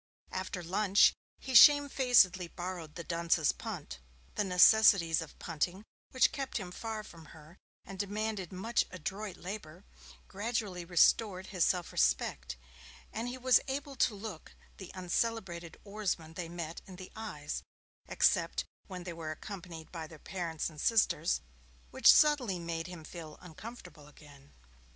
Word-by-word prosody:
After 185 Hz, -1 st, -4 dB
lunch 195 Hz, +3 st, +4 dB, 0.2 s
he 265 Hz, -, -7 dB
shamefacedly 250 Hz, -, +6 dB
borrowed 175 Hz, -3 st, -7 dB
the 170 Hz, -, -6 dB
dunce's 170 Hz, -2 st, +1 dB
punt. -, -, -7 dB, 0.3 s
The -, -, 0 dB
necessities 180 Hz, -3 st, +5 dB
of 160 Hz, -, -10 dB
punting, 180 Hz, +6 st, -3 dB, 0.2 s
which 260 Hz, -, +3 dB
kept 270 Hz, -2 st, -4 dB
him 185 Hz, -5 st, -6 dB
far 220 Hz, +2 st, -5 dB
from 165 Hz, -6 st, -13 dB
her, 160 Hz, +4 st, -16 dB, 0.3 s
and 195 Hz, -1 st, -9 dB
demanded 205 Hz, -2 st, -3 dB
much 205 Hz, +5 st, 0 dB
adroit 190 Hz, +3 st, -6 dB
labour, 180 Hz, -2 st, -8 dB, 0.4 s
gradually 205 Hz, -4 st, -3 dB
restored 185 Hz, +2 st, +3 dB
his 180 Hz, -3 st, +3 dB
self 180 Hz, -2 st, 0 dB
respect, -, -, 0 dB, 0.6 s
and 225 Hz, +2 st, -3 dB
he 250 Hz, +1 st, -5 dB
was 255 Hz, 0 st, +5 dB
able 275 Hz, +1 st, -4 dB
to 225 Hz, -, +2 dB
look 200 Hz, -5 st, -9 dB, 0.2 s
the 190 Hz, -, -9 dB
uncelebrated 180 Hz, -2 st, -2 dB
oarsmen 200 Hz, -6 st, -3 dB
they 170 Hz, -1 st, -6 dB
met 170 Hz, -1 st, -6 dB
in 190 Hz, -, -10 dB
the 185 Hz, 0 st, -10 dB
eyes, 220 Hz, -, -5 dB, 0.5 s
except -, -, +2 dB, 0.2 s
when 185 Hz, -2 st, -7 dB
they 175 Hz, -1 st, -6 dB
were 165 Hz, -1 st, -6 dB
accompanied 170 Hz, -1 st, -8 dB
by 165 Hz, -3 st, -6 dB
their 160 Hz, -, -13 dB
parents 170 Hz, -1 st, -4 dB
and 155 Hz, -3 st, -9 dB
sisters, 175 Hz, -, +2 dB, 0.5 s
which -, -, +7 dB
subtly 290 Hz, -11 st, +4 dB
made 170 Hz, -1 st, -4 dB
him 175 Hz, -3 st, -9 dB
feel 155 Hz, -1 st, -9 dB
uncomfortable 180 Hz, -4 st, -11 dB
again. 145 Hz, -2 st, -17 dB
185 Hz, 140 wpm, -32 LUFS, 165-215 Hz, 0.6 s, which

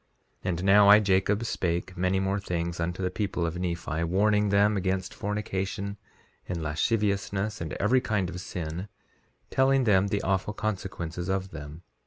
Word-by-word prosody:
3:12 -, -, -1 dB
And 90 Hz, 0 st, -2 dB
now 100 Hz, +1 st, +6 dB
I, 105 Hz, +1 st, +9 dB
Jacob, 100 Hz, +2 st, +2 dB
spake 90 Hz, -3 st, -2 dB
many 95 Hz, +1 st, +1 dB
more 95 Hz, +1 st, 0 dB
things 85 Hz, -3 st, -3 dB
unto 85 Hz, +2 st, -2 dB
the 90 Hz, -, 0 dB
people 95 Hz, -3 st, -1 dB
of 85 Hz, +2 st, -3 dB
Nephi, 85 Hz, -2 st, -2 dB
warning 105 Hz, +4 st, +2 dB
them 100 Hz, +1 st, +4 dB
against 95 Hz, -1 st, -1 dB
fornication 100 Hz, -1 st, -3 dB, 0.5 s
and 90 Hz, -2 st, -2 dB
lasciviousness, 100 Hz, +4 st, 0 dB
and 80 Hz, -2 st, -4 dB
every 125 Hz, +5 st, +2 dB
kind 105 Hz, -6 st, 0 dB
of 90 Hz, 0 st, -6 dB
sin, 90 Hz, +1 st, -5 dB, 0.6 s
telling 135 Hz, 0 st, +3 dB
them 100 Hz, -4 st, +4 dB
the 100 Hz, 0 st, -1 dB
awful 95 Hz, +2 st, 0 dB
consequences 90 Hz, -5 st, -4 dB
of 95 Hz, 0 st, -1 dB
them. 75 Hz, +2 st, -9 dB
95 Hz, 160 wpm, -27 LUFS, 90-105 Hz, 0.6 s, I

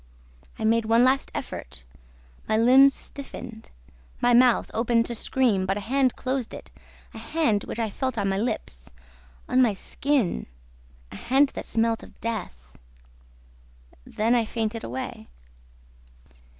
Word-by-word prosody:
I -, -, -5 dB
made 225 Hz, 0 st, +2 dB
one 230 Hz, +2 st, +4 dB
last 265 Hz, +2 st, +2 dB
effort; 70 Hz, -, -6 dB, 0.7 s
my 215 Hz, -, +3 dB
limbs 260 Hz, +4 st, +7 dB
stiffened, 245 Hz, -5 st, -9 dB, 0.5 s
my 245 Hz, -, +3 dB
mouth 245 Hz, 0 st, +4 dB
opened 230 Hz, 0 st, +2 dB
to 240 Hz, -, -4 dB
scream, 225 Hz, -5 st, +1 dB
but 195 Hz, +1 st, 0 dB
a -, -, -4 dB
hand 260 Hz, +4 st, +1 dB
closed 255 Hz, -2 st, -3 dB
it, -, -, -11 dB, 0.4 s
a -, -, -8 dB
hand 230 Hz, -11 st, 0 dB
which -, -, -6 dB
I 225 Hz, -3 st, -1 dB
felt 260 Hz, 0 st, -3 dB
on 200 Hz, -2 st, 0 dB
my 195 Hz, 0 st, 0 dB
lips, 65 Hz, -, -4 dB, 0.6 s
on 255 Hz, -, +3 dB
my 225 Hz, -5 st, +3 dB
skin... 260 Hz, 0 st, -1 dB, 0.6 s
a -, -, -8 dB
hand 270 Hz, +4 st, +3 dB
that -, -, -7 dB
smelt 225 Hz, 0 st, +1 dB
of -, -, -15 dB
death. 65 Hz, -, -6 dB, 1.3 s
Then 220 Hz, -, 0 dB
I 240 Hz, -2 st, +3 dB
fainted 225 Hz, 0 st, -3 dB
away. 120 Hz, -2 st, -6 dB
230 Hz, 140 wpm, -25 LUFS, 215-255 Hz, 1.3 s, limbs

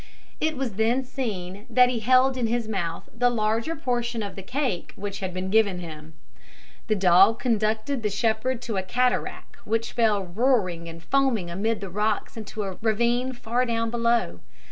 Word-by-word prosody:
It 315 Hz, -2 st, 0 dB
was 245 Hz, -7 st, -3 dB
then 235 Hz, +4 st, +2 dB
seen 210 Hz, -6 st, -5 dB
that 250 Hz, +1 st, +6 dB
he 245 Hz, -2 st, -1 dB
held 255 Hz, +3 st, +4 dB
in 245 Hz, -3 st, 0 dB
his 235 Hz, 0 st, -1 dB
mouth 175 Hz, -6 st, -3 dB
the 245 Hz, +1 st, +3 dB
larger 225 Hz, +6 st, 0 dB
portion 240 Hz, -5 st, -2 dB
of 200 Hz, -, -6 dB
the 195 Hz, -, -6 dB
cake 245 Hz, -, -2 dB
which 200 Hz, 0 st, -5 dB
had 190 Hz, -1 st, -3 dB
been 185 Hz, +1 st, -4 dB
given 210 Hz, -4 st, +3 dB
him. 160 Hz, -2 st, -9 dB, 0.7 s
The 215 Hz, -, +2 dB
dog 195 Hz, +3 st, +5 dB
conducted 225 Hz, +2 st, 0 dB
the 210 Hz, -, 0 dB
shepherd 230 Hz, +4 st, 0 dB
to 225 Hz, -4 st, -3 dB
a -, -, +1 dB
cataract 250 Hz, +7 st, -1 dB
which 225 Hz, +2 st, -1 dB
fell 215 Hz, -4 st, +2 dB
roaring 185 Hz, -4 st, 0 dB
and 165 Hz, 0 st, -10 dB
foaming 235 Hz, -5 st, +1 dB
amid 205 Hz, +3 st, -1 dB
rocks 210 Hz, +3 st, -1 dB
into 215 Hz, -1 st, -5 dB
a 190 Hz, -2 st, -5 dB
ravine 235 Hz, +3 st, +1 dB
far 240 Hz, 0 st, -1 dB
down 230 Hz, -2 st, -1 dB
below. 235 Hz, -, +1 dB
220 Hz, 170 wpm, -25 LUFS, 195-245 Hz, 0.7 s, that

